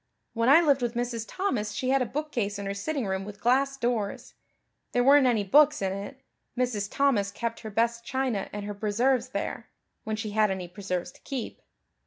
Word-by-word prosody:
When 230 +1 +2
I 305 +5 +8
lived 285 -5 +3
with 240 -1 -1
Mrs. 235 -2 -2
Thomas 240 - -2
she 255 +3 -2
had 270 0 +3
a 250 - 0
bookcase 240 -8 -2
in 200 - -5
her 195 - -2
sitting 265 +6 -2
room 190 0 -2
with 205 +1 -9
glass 270 +4 +2
doors. 235 -5 -2 0.6
There 245 - +3
weren't 275 0 +6
any 225 -4 +2
books 295 +9 +5
in 190 -1 -1
it; 205 +7 -7 0.3
Mrs. 225 -5 -1
Thomas 250 -8 +2
kept 230 +3 -4
her 220 - -7
best 235 +2 0
china 250 -5 -2
and 205 0 -5
her 205 - -4
preserves 230 +5 +1
there - - -4 0.3
when 220 - -2
she 215 -1 -4
had 215 0 +3
any 190 -2 -3
preserves 180 -1 -4
to - - -21
keep. 265 -4 -5
230 Hz, 200 wpm, -27 LUFS, 205-265 Hz, 0.6 s, I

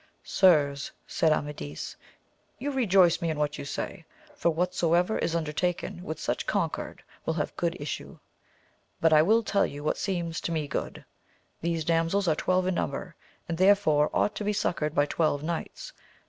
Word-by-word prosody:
Sirs, 145 -7 +3
said 160 - +2
Amadis, 145 - -3 0.6
you 285 +3 -3
rejoice 195 - +4
me 170 - 0
in 155 - -2
what 150 0 -1
you - - -5
say; 170 +5 -5 0.3
for 290 -12 +1
whatsoever 175 +3 +1
is 170 - -1
under 155 -2 -2
taken 175 +1 -2
with 155 -3 -5
such - - -2
concord - - -2 0.2
will 160 - -1
have 150 - -2
good 170 0 -1
issue. 145 0 -5 0.8
But 165 -1 +4
I 155 - +7
will 220 +8 +4
tell 200 -1 +2
you 145 +1 -8
what 155 - 0
seems 170 -4 -2
to - - -3
me 155 -3 -1
good: - - -4 0.6
these 165 -2 -1
damsels 165 +4 +1
are 160 - +4
twelve 185 +3 +1
in 185 - +1
number, - - -3 0.3
and 165 0 -3
therefore 185 -7 +4
ought 210 - +1
to - - -3
be 210 +1 0
suc 200 - 0
coured 150 0 -2
by 145 - +4
twelve 150 -1 0
knights. 170 - -5
170 Hz, 175 wpm, -28 LUFS, 155-185 Hz, 0.8 s, I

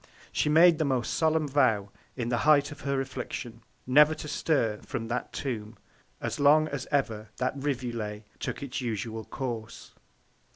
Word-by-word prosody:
She - - +1
made 165 +1 +6
the - - +3
most 130 -4 0
solemn 160 -1 +2
Vow, 115 -8 +2 0.2
in 120 -2 -2
the 120 -1 +1
Height 145 +1 +4
of 145 - -10
her 140 -1 0
Affliction, 135 - -5 0.2
never 150 +4 +6
to 150 - -7
stir 135 -8 0
from 115 -4 -5
that 125 +1 -3
Tomb, 115 -5 -4 0.4
as - - -3
long 150 +2 +5
as 140 -3 -4
ever 115 -7 -1
that 130 0 0
Rivulet 120 -6 -3 0.2
took - - -4
its 135 -1 -4
usual 110 -1 -3
Course. 115 -3 -6
130 Hz, 160 wpm, -28 LUFS, 115-145 Hz, 0.4 s, made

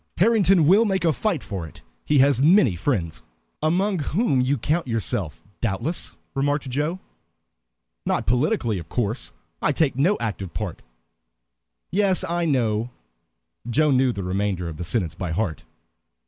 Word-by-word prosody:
Harrington 195 -4 +4
will 195 +8 +6
make 190 -5 0
a 160 - +3
fight 185 -3 -1
for 95 -6 -5
it. - - -16 0.2
He 150 - +2
has 135 -1 +4
many 150 - +5
friends." 85 - -2 0.4
"Among 185 +5 +1
whom 150 - +1
you 135 +3 +1
count 150 +6 -1
yourself, 100 - -2 0.2
doubtless," 115 - -2 0.2
remarked 145 +1 0
Joe. 150 +7 -1 1.0
"Not - - -1
politically, 125 - +1
of 80 - -10
course. 115 0 -2 0.3
I - - +2
take 145 -3 +1
no 170 +10 +2
active 100 -6 -4
part" 100 -6 -4 1.1
"Yes, 190 0 +2
I 170 0 0
know." 120 -6 +1 0.8
Joe 150 +5 +3
knew 130 -1 +3
the 100 -4 -5
remainder 95 -1 -1
of 80 -2 -6
the 85 - -4
sentence 85 -2 -1
by 85 0 -4
heart. 80 -5 -2
130 Hz, 145 wpm, -23 LUFS, 100-165 Hz, 1.1 s, will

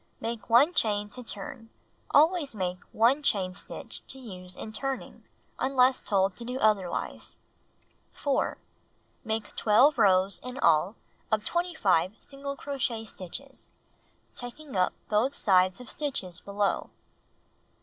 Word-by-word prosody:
Make 230 -1 -5
1 265 +9 +6
chain 210 -6 +1
to 250 - -8
turn. 245 -1 -6 0.4
Ahvays 310 -3 +4
make 180 -2 -2
1 245 +7 +3
chain 190 -9 +2
stitch - - -6
to 265 - -2
use 185 -7 -10
in 220 - -7
turning, 270 +4 -4 0.3
unless 260 -1 +3
told 195 -2 +1
to 240 - -6
do 250 +2 -4
otherwise. 210 -6 0 0.8
4. 280 -2 0 0.7
Make 220 -2 -3
12 250 +6 +4
rows 190 -1 +4
(in 250 +1 -6
all) 180 - +3 0.4
of 215 -1 +1
25 220 - +1
single 280 0 -7
crochet 255 -6 -2
stitches, 220 +8 -7 0.7
taking 255 +3 -8
up 185 -1 +2
both 220 +6 +2
loops 185 0 +4
of 250 - -10
stitches 190 - -4
below. 200 0 -1
225 Hz, 125 wpm, -28 LUFS, 195-270 Hz, 0.8 s, 1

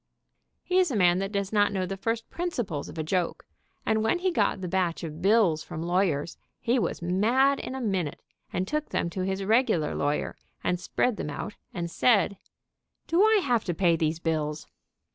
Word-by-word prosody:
He 370 0 +2
is 365 -2 +3
a 260 - -2
man 180 -2 +4
that 195 +1 -2
does 200 0 -2
not 205 -1 +4
know 190 -2 -1
the 195 - -4
first 225 +3 -2
principles 240 - -3
of - - -10
a 160 - -1
joke, 175 +2 -1 0.4
and 220 0 +2
when 225 +10 +2
he 370 +1 0
got 335 - +1
the 180 - -3
batch 175 -2 0
of 160 0 -6
bills 195 -5 +4
from 160 - -6
lawyers, 170 -3 0 0.2
he 245 +1 +1
was 195 - -2
mad 235 +10 +3
in 260 - -5
a 265 - -4
minute, 190 - -1 0.3
and 185 - -1
took 300 +3 -2
them 170 - -1
to 185 - -3
his 190 +1 -1
regular 215 -7 +2
lawyer 145 +1 -1 0.3
and 180 - 0
spread 235 +5 0
them - - -4
out 175 +8 -5 0.2
and 170 -2 -4
said: 200 -4 +3 0.7
"Do 335 +3 +2
I 435 -1 +5
have 240 -4 +2
to 175 - -2
pay 170 -1 +3
these 160 0 0
bills?" 155 -2 -2
195 Hz, 200 wpm, -27 LUFS, 170-230 Hz, 0.7 s, I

